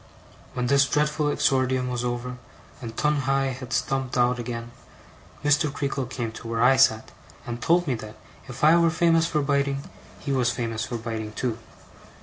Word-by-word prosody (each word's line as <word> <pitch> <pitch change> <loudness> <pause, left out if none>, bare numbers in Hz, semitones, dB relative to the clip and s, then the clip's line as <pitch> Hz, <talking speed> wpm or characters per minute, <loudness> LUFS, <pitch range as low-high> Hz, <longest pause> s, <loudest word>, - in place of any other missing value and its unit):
When 125 -1 -2
this 140 +2 +4
dreadful 150 +1 +1
exordium 130 -2 +1
was 125 -1 -2
over, 125 +1 -3 0.4
and 115 -2 -7
Tungay 135 -2 +1
had 130 -1 -9
stumped 135 -2 -1
out 125 0 +2
again, 115 0 -5 0.7
Mr. 145 +1 +3
Creakle 140 -2 -2
came 120 -2 -4
to 115 - -9
where 115 0 0
I 130 +2 +6
sat, 110 -4 +3 0.3
and 120 0 -5
told 175 +8 +3
me 135 - 0
that 110 -2 -7 0.3
if 125 +1 -9
I 155 +2 +7
were 170 -1 +4
famous 165 0 +3
for 150 -3 0
biting, 140 -1 0 0.4
he 140 - -4
was 130 -3 +2
famous 115 -2 -2
for 120 - -4
biting, 110 -2 -5
too. 120 0 -2
130 Hz, 170 wpm, -25 LUFS, 120-140 Hz, 0.7 s, I